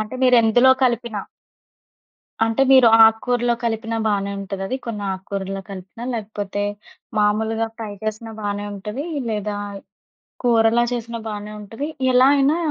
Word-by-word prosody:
అంటే, 215 Hz, +3 st, -5 dB
మీరెందులో 245 Hz, 0 st, +5 dB
కలిపినా. 235 Hz, -3 st, -1 dB, 1.2 s
అంటే, 225 Hz, +4 st, +1 dB
మీరు 260 Hz, -3 st, +8 dB, 0.2 s
ఆక్కూరలో 240 Hz, +2 st, +2 dB
కలిపినా 225 Hz, 0 st, -2 dB
బానే 200 Hz, -1 st, 0 dB
ఉంటదది. 195 Hz, +4 st, -4 dB
కొన్నాక్కూరల్లో 195 Hz, -2 st, -4 dB
కలిపినా, 195 Hz, +5 st, -9 dB
లేకపోతే, 205 Hz, -2 st, -4 dB, 0.6 s
మాములుగా 220 Hz, +2 st, +1 dB
ఫ్రై 220 Hz, -3 st, -6 dB
చేసినా 220 Hz, +1 st, -4 dB
బానే 205 Hz, 0 st, -3 dB
ఉంటదీ, 210 Hz, -, -5 dB, 0.2 s
లేదా 210 Hz, -1 st, -2 dB, 0.9 s
కూరలా 230 Hz, 0 st, +4 dB
చేసిన 235 Hz, -1 st, -4 dB
బానే 210 Hz, 0 st, -6 dB
ఉంటది, 225 Hz, +8 st, -6 dB, 0.2 s
ఎలా 255 Hz, +1 st, +6 dB
అయినా 280 Hz, +3 st, +3 dB
220 Hz, 115 wpm, -21 LUFS, 205-235 Hz, 1.2 s, మీరు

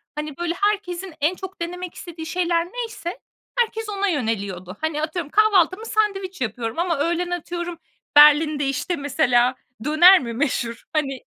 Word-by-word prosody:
hani, 300 Hz, -1 st, -5 dB
böyle, 345 Hz, -1 st, -1 dB
herkesin 385 Hz, -3 st, -1 dB
en 315 Hz, +5 st, +2 dB
çok 380 Hz, -1 st, -9 dB
denemek 360 Hz, +1 st, -5 dB
istediği 330 Hz, -2 st, -8 dB
şeyler 340 Hz, 0 st, 0 dB
neyse 445 Hz, -4 st, -6 dB, 0.4 s
herkes 445 Hz, -2 st, 0 dB
ona 405 Hz, -1 st, -1 dB
yöneliyordu. 200 Hz, -, -3 dB
Hani, 315 Hz, -1 st, -1 dB
atıyorum 315 Hz, -1 st, -3 dB
kahvaltımı 410 Hz, -1 st, +3 dB
sandviç 390 Hz, -6 st, -1 dB
yapıyorum 230 Hz, +3 st, -3 dB
ama 340 Hz, -2 st, 0 dB
öğlen 345 Hz, +3 st, 0 dB
atıyorum 345 Hz, 0 st, -4 dB, 0.4 s
Berlin'de, 295 Hz, 0 st, +6 dB
işte, 275 Hz, +6 st, -1 dB
mesela 255 Hz, -4 st, +2 dB, 0.3 s
döner 345 Hz, +6 st, +7 dB
mi 235 Hz, -3 st, -5 dB
meşhur? 235 Hz, -2 st, -2 dB
Hani, 275 Hz, -4 st, -1 dB
335 Hz, 140 wpm, -22 LUFS, 285-370 Hz, 0.4 s, döner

